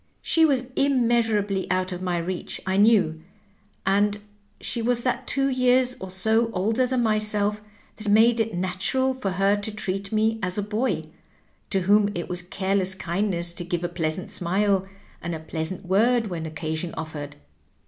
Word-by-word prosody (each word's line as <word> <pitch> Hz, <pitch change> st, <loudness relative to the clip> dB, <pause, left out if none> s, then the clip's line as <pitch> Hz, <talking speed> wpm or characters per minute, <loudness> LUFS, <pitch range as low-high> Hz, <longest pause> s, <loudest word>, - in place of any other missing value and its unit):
She 325 Hz, -1 st, +4 dB
was 270 Hz, -5 st, +2 dB
immeasurably 230 Hz, -7 st, +1 dB
out 185 Hz, 0 st, 0 dB
of 180 Hz, 0 st, -5 dB
my 180 Hz, -2 st, -1 dB
reach, 175 Hz, +2 st, -4 dB
I 190 Hz, 0 st, 0 dB
knew; 200 Hz, -6 st, +4 dB, 0.6 s
and 205 Hz, +2 st, +2 dB, 0.4 s
she 235 Hz, -, -3 dB
was 240 Hz, +1 st, +1 dB
that 255 Hz, -, -1 dB
two 275 Hz, 0 st, +2 dB
years 255 Hz, -1 st, +3 dB
or 190 Hz, -, -7 dB
so 220 Hz, +5 st, +2 dB
older 220 Hz, +7 st, +1 dB
than 250 Hz, -1 st, 0 dB
myself 210 Hz, -1 st, +1 dB, 0.4 s
that 215 Hz, -1 st, -4 dB
made 225 Hz, +3 st, +5 dB
it 225 Hz, -2 st, 0 dB
nat 185 Hz, +5 st, -2 dB
ural 260 Hz, 0 st, +2 dB
for 255 Hz, -7 st, -3 dB
her 195 Hz, +2 st, +3 dB
to 205 Hz, +1 st, -4 dB
treat 195 Hz, -1 st, -4 dB
me 220 Hz, +1 st, +1 dB
as 180 Hz, 0 st, -2 dB
a 205 Hz, -, 0 dB
boy, 215 Hz, +5 st, -1 dB, 0.7 s
to 195 Hz, -, +1 dB
whom 205 Hz, +2 st, +4 dB
it 175 Hz, -, -3 dB
was 180 Hz, 0 st, -3 dB
a -, -, -18 dB
care 190 Hz, +2 st, -1 dB
less 190 Hz, -1 st, 0 dB
kindness 175 Hz, -1 st, -1 dB
to 175 Hz, -, -4 dB
give 175 Hz, 0 st, -3 dB
a 175 Hz, -, -1 dB
pleasant 170 Hz, 0 st, -2 dB
smile, 190 Hz, +2 st, +1 dB, 0.3 s
and 170 Hz, -1 st, -3 dB
a -, -, -5 dB
pleasant 160 Hz, +3 st, -4 dB
word 225 Hz, +6 st, +3 dB
when 165 Hz, -2 st, -4 dB
occasion 160 Hz, +2 st, -4 dB
oJSered. 150 Hz, -3 st, -6 dB
200 Hz, 180 wpm, -25 LUFS, 180-225 Hz, 0.7 s, made